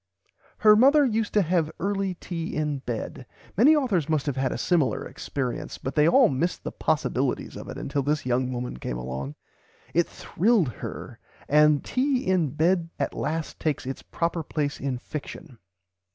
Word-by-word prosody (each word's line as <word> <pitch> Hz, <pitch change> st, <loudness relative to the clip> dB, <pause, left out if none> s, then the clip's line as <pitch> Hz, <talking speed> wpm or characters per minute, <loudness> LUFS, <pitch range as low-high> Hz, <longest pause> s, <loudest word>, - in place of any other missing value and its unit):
"Her 215 Hz, -1 st, +7 dB
mother 280 Hz, +6 st, +6 dB
used 225 Hz, -3 st, 0 dB
to 205 Hz, -, +5 dB
have 170 Hz, -2 st, +1 dB
early 195 Hz, -1 st, -1 dB
tea 170 Hz, -1 st, -5 dB
in 150 Hz, -2 st, -1 dB
bed." 125 Hz, +1 st, -5 dB, 0.3 s
Many 275 Hz, -, +6 dB
authors 200 Hz, -, +1 dB
must 155 Hz, -3 st, +1 dB
have 145 Hz, -3 st, -1 dB
had 130 Hz, -1 st, 0 dB
a -, -, -3 dB
similar 155 Hz, -, +1 dB
experience, 130 Hz, -3 st, -4 dB
but 135 Hz, -, -5 dB
they 150 Hz, 0 st, +4 dB
all 170 Hz, -, +6 dB
missed 155 Hz, +6 st, -1 dB
the -, -, -4 dB
possibilities 140 Hz, -4 st, -1 dB
of -, -, -8 dB
it -, -, -6 dB
until 140 Hz, 0 st, -2 dB
this 145 Hz, +1 st, -1 dB
young 125 Hz, 0 st, 0 dB
woman 125 Hz, -, -4 dB
came 60 Hz, -1 st, -4 dB
along. 65 Hz, +3 st, -5 dB, 0.6 s
It 170 Hz, +1 st, +3 dB
thrilled 200 Hz, -, +1 dB
her; 115 Hz, -, -8 dB, 0.3 s
and 150 Hz, 0 st, +4 dB
tea 260 Hz, 0 st, 0 dB
in 185 Hz, -4 st, +2 dB
[Pg -, -, -6 dB
ix] -, -, -15 dB
bed 170 Hz, +1 st, +2 dB
at -, -, -1 dB
last 160 Hz, 0 st, -3 dB
takes 155 Hz, -5 st, -1 dB
its 135 Hz, +1 st, -5 dB
proper 170 Hz, 0 st, -2 dB
place 145 Hz, -2 st, -2 dB
in 135 Hz, -2 st, -2 dB
fiction. 140 Hz, -1 st, -8 dB
155 Hz, 180 wpm, -26 LUFS, 135-185 Hz, 0.6 s, Her